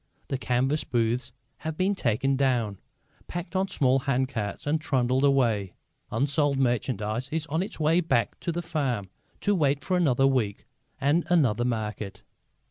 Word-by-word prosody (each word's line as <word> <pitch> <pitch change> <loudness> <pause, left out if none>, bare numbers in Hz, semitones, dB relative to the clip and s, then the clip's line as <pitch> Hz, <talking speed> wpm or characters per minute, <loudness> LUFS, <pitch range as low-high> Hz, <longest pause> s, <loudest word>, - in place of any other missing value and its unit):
The 135 - 0
canvas 130 +4 +1
booths 120 +1 0 0.3
have 160 -1 -5
been 190 +2 +2
taken 135 - +1
down, 120 -7 +1 0.5
packed 175 +1 -6
on 190 +1 +2
small 135 -8 +2
handcarts 130 -6 -2
and 155 +2 +1
trundled 130 -2 +1
away; 115 -9 +2 0.3
unsold 140 +3 +1
merchandise 120 -2 0
is 160 -1 -1
on 160 +3 +1
its 195 - -5
way 160 +3 +3
back 130 -9 0
to 170 - -2
the 175 +1 -3
farm 130 - -2 0.3
to 205 - +2
wait 145 -6 +1
for 185 - 0
another 135 -6 +3
week 125 -7 0 0.3
and 150 +5 +2
another 125 -10 +3
market. 105 -4 -3
135 Hz, 150 wpm, -27 LUFS, 120-155 Hz, 0.5 s, way